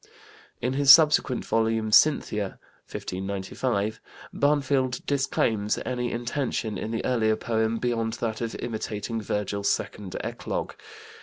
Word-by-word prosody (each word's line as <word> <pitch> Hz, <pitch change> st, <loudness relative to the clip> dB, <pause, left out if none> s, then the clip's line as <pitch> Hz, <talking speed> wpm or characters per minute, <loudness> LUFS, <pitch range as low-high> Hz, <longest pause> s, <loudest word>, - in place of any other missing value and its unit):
In 125 Hz, +1 st, 0 dB
his 140 Hz, 0 st, +1 dB
subsequent 150 Hz, -4 st, +6 dB
volume, 110 Hz, -1 st, 0 dB
Cynthia 105 Hz, -7 st, +3 dB, 0.3 s
(1595), 100 Hz, +3 st, -3 dB, 0.3 s
Barnfield 140 Hz, -3 st, +1 dB
disclaims 115 Hz, -6 st, 0 dB
any 125 Hz, -1 st, -2 dB
intention 120 Hz, -2 st, -2 dB
in 105 Hz, -, -4 dB
the 115 Hz, 0 st, -3 dB
earlier 110 Hz, -3 st, +2 dB
poem 110 Hz, 0 st, -1 dB
beyond 115 Hz, -1 st, -1 dB
that 115 Hz, -1 st, -3 dB
of 115 Hz, -1 st, -3 dB
imitating 110 Hz, -1 st, -4 dB
Virgil's 100 Hz, -1 st, -1 dB
second 100 Hz, -4 st, -3 dB
eclogue. -, -, -4 dB
115 Hz, 110 wpm, -26 LUFS, 105-125 Hz, 0.3 s, subsequent